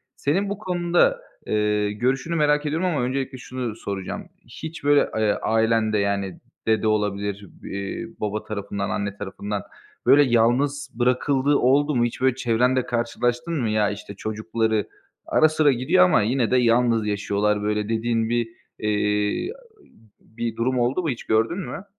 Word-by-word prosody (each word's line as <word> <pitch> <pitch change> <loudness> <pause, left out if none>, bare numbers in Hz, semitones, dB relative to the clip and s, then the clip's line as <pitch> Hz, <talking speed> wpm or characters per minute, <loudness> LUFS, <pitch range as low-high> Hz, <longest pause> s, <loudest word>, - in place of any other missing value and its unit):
Senin 190 +8 0
bu 200 - -3
konuda, 175 -3 +1 0.3
eee, 105 -1 +1
görüşünü 130 +9 -1
merak 150 -1 +2
ediyorum 160 +5 0
ama 150 -7 0
öncelikle 130 +1 -2
şunu 125 -3 -5
soracağım. 100 -3 -5 0.2
Hiç 160 -1 -8
böyle, 145 0 +4
eee, 110 -1 +2
ailende 110 -1 +2
yani 100 -2 -1 0.3
dede 110 0 +2
olabilir, 100 -1 -1 0.2
iii, 100 +3 -6
baba 105 0 -2
tarafından, 100 -2 -4
anne 100 0 -3
tarafından, 100 0 -5 0.4
böyle 140 +4 +7
yalnız 135 +4 +1
bırakıldığı 130 +3 +2
oldu 145 +3 +3
mu? 120 - +3
Hiç 120 - -5
böyle 130 -1 +3
çevrende 125 0 +1
karşılaştın 120 +5 -1
mı? 115 - 0
Ya, 105 -1 +2
işte 100 -1 -8
çocukları 110 0 -1 0.4
ara 155 - +4
sıra 155 -2 +3
gidiyor 125 -7 +4
ama 90 - +4
yine 120 +1 0
de 130 - +4
yalnız 115 -2 +3
yaşıyorlar 105 0 0
böyle 105 0 -1
dediğin 115 0 0
bir, 120 -1 0 0.3
eee, 105 - 0 0.7
bir 115 0 -5
durum 125 +2 0
oldu 125 +9 +1
mu, 160 - 0
hiç 120 - -4
gördün 115 - +1
mü? 175 +4 -6
115 Hz, 150 wpm, -23 LUFS, 105-135 Hz, 0.7 s, böyle